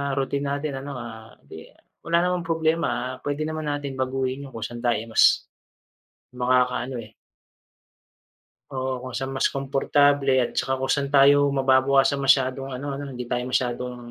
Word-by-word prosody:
routine 140 +1 -1
natin 140 0 -3
ano, 140 +1 -7
ah, 110 -2 -9
'di 80 +3 -11 0.3
wala 170 +1 +1
namang 180 -2 -1
problema 160 -6 -1
puwede 145 +1 -3
naman 155 0 -4
natin 145 -2 -4
baguhin 130 +1 -2
yung 130 - -14
kung 115 - -5
san 120 0 -6
tayo 120 -1 +1
mas, - - +5 0.9
makakaano, 125 0 +1
eh. 110 -1 -13 1.6
Oo, 130 -1 -3
kung 130 - -7
saan 135 +2 -4
mas 130 - +1
komportable 140 0 +2
at 125 - 0
saka 130 0 -1
kung 130 - -2
saan 140 -1 -2
tayo 145 0 +5
mababawasan 135 +1 +3
masyadong 135 0 +2
ano 135 +2 -4
'no, 140 0 -6
hindi 125 -1 -6
tayo 120 +1 -2
masyadong 125 0 -1
135 Hz, 155 wpm, -24 LUFS, 125-140 Hz, 1.6 s, mas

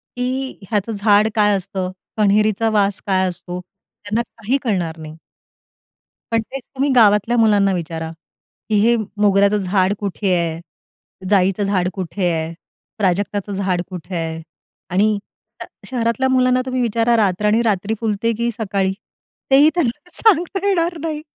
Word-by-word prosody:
की 255 +2 -3
ह्याचं 210 +1 -1
झाड 205 0 +3
काय 210 -1 +4
असतं? 185 -1 -4 0.3
कन्हेरीचा 215 +1 +2
वास 200 -2 +1
काय 190 -1 +2
असतो? 180 0 -6
त्यांना 205 +4 -6
काही 235 +3 -2
कळणार 175 -8 -1
नाही. 155 0 -9 1.2
पण 225 -1 +2
तेच 265 +3 -8
तुम्ही 275 +2 +1
गावातल्या 215 +1 +4
मुलांना 205 -3 +4
विचारा, 165 -2 -4 0.6
की 215 - +1
हे 235 +2 +4 0.3
मोगऱ्याचं 200 0 +4
झाड 190 0 +1
कुठे 195 -1 -1
आहे? 165 -1 -1 0.7
जाईचं 195 0 +2
झाड 190 -3 +1
कुठे 185 -1 -2
आहे? 160 0 -2 0.4
प्राजक्ताचं 205 +1 -1
झाड 190 -3 -1
कुठे 180 0 -7
आहे? 165 -1 -3 0.5
आणि 205 +3 +2 0.4
श - - -5 0.2
शहरातल्या 250 +1 0
मुलांना 255 0 +3
तुम्ही 255 -1 -1
विचारा, 230 0 +2
रातराणी 210 +2 +2
रात्री 210 -1 0
फुलते 225 +1 0
की 235 0 0
सकाळी? 195 -3 -1 0.6
तेही 285 +3 +7
त्यांना 295 +1 -2
सांगता 385 -1 +2
येणार 340 -3 +1
नाही. 310 -2 -3
205 Hz, 140 wpm, -19 LUFS, 190-235 Hz, 1.2 s, तेही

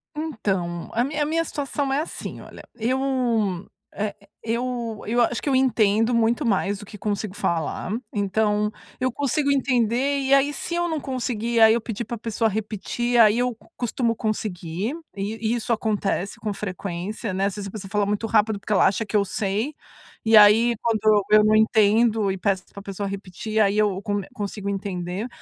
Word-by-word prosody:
Então, 195 - -2
a 235 - +2
minha 295 +3 -1
a - - 0
minha 325 +2 +1
situação 285 -2 -2
é 280 - +2
assim, 320 - -6
olha. - - -12
Eu, 245 +3 0 0.9
eh, 210 -1 -3 0.3
eu 235 -1 -3
eu 240 +3 +2
acho 235 0 +1
que - - -7
eu 270 - +2
entendo 225 -3 +3
muito 235 +5 +2
mais 200 -2 +1
do 205 - -9
que 210 - -11
consigo 205 -1 -3
falar, 165 +1 -2 0.2
então, 210 +1 +1 0.3
eu 255 0 +1
consigo 280 +2 0
entender 255 +1 +1
e 270 0 +1
aí 275 +1 +4
se 295 - -5
eu 345 0 0
não 320 -2 -1
conseguir 240 -4 -3
e - - +4
aí 220 0 +8
eu 235 - -1
pedir 225 0 -4
pra 235 +2 -5
pessoa 225 0 0
repetir, 220 +3 -2
aí 215 -1 +6
eu 250 -1 0 0.2
costumo 235 -1 0
conseguir 210 - -3 0.2
e 200 +2 -3 0.2
e - - +2
isso 235 0 -3
acontece 210 -3 -1
com 210 - -3
frequência, 195 +1 -4
né 190 +1 0
às 200 - -1
vezes 205 -1 -5
a - - -8
pessoa 200 -2 -8
fala 210 -1 +1
muito 210 +2 -1
rápido 215 -2 +2
porque 210 - -3
ela 195 - +5
acha 205 +4 0
que 215 - -5
eu 205 - +4
sei 205 +8 -2 0.5
e 225 0 +5
aí 215 +3 +7
quando 215 -2 +3
eu 215 0 +6
não 215 0 +4
entendo 220 -1 +3
e 190 - -3
peço 190 -1 0
pra 200 - -8
pessoa 200 0 -4
repetir, 200 +2 -4
aí 205 -1 +3
eu 205 -3 +1
co 205 0 -1
consigo 205 -3 -4
entender. 195 +1 -3
215 Hz, 190 wpm, -24 LUFS, 200-240 Hz, 0.9 s, aí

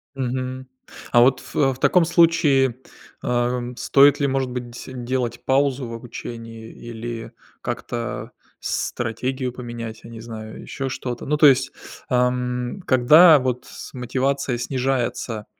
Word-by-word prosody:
Мгм. 130 0 -3 0.5
А 120 - +6
вот 125 +1 +4
фе 135 -2 0
в - - -15
таком 165 +6 +4
случае, 160 -7 +3 0.5
а, 120 0 +1
м, 120 0 -6
стоит 140 +3 +5
ли, 140 - +3
может 135 -1 -1
быть 125 -1 -5
деси 120 +2 -9
делать 125 0 -3
паузу 135 -1 +1
в 115 - -7
обучении 115 -1 -8
или 115 0 -7 0.3
как-то 120 -1 -4 0.3
стратегию 125 +2 -2
поменять, 120 -2 -7
я 115 - -10
не 115 -1 -9
знаю, 110 -1 -8
ещё 135 -1 -4
что-то? 125 -2 -5
Ну, 150 - +1
то 150 - +6
есть, 135 -1 +5 0.4
ам, 125 +3 0
когда 150 +6 +7
вот 125 -2 -2
с - - -10
мотивация 130 +1 -1
снижается, 125 -3 -2
125 Hz, 140 wpm, -22 LUFS, 120-135 Hz, 0.5 s, когда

